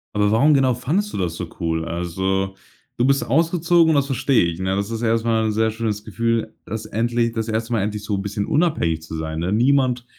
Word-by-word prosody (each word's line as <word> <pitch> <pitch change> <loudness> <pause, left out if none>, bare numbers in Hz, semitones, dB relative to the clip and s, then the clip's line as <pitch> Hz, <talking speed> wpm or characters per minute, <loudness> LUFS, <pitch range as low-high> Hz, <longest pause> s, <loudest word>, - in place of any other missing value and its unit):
Aber 105 0 +2
warum 140 +8 +4
genau 135 -2 +3
fandest 170 - -1
du - - -3
das 85 -4 -2
so 90 - -5
cool? 80 -1 -1
Also, 95 +3 -2 0.4
du 120 - +2
bist 135 +1 +2
ausgezogen, 165 +3 +3
das 140 -2 +2
verstehe 135 -5 +2
ich, 85 0 -3
ne, 95 +1 -1
das 100 +2 -2
ist 115 -1 -4
erstmal 115 -1 +1
'n 110 - +1
sehr 110 +1 +1
schönes 110 -2 -3
Gefühl, 115 0 -1
dass 110 0 -5
endlich 115 +1 0
das 110 -1 -3
1. 115 +2 -2
Mal 115 - +1
endlich 105 +1 -3
so 105 -1 -2
'n 95 - -2
bisschen 100 +1 -3
unabhängig 145 - +1
zu 80 0 -8
sein, 80 0 -4
ne? 85 +3 -1
Niemand 125 +1 +2
110 Hz, 220 wpm, -21 LUFS, 95-125 Hz, 0.4 s, warum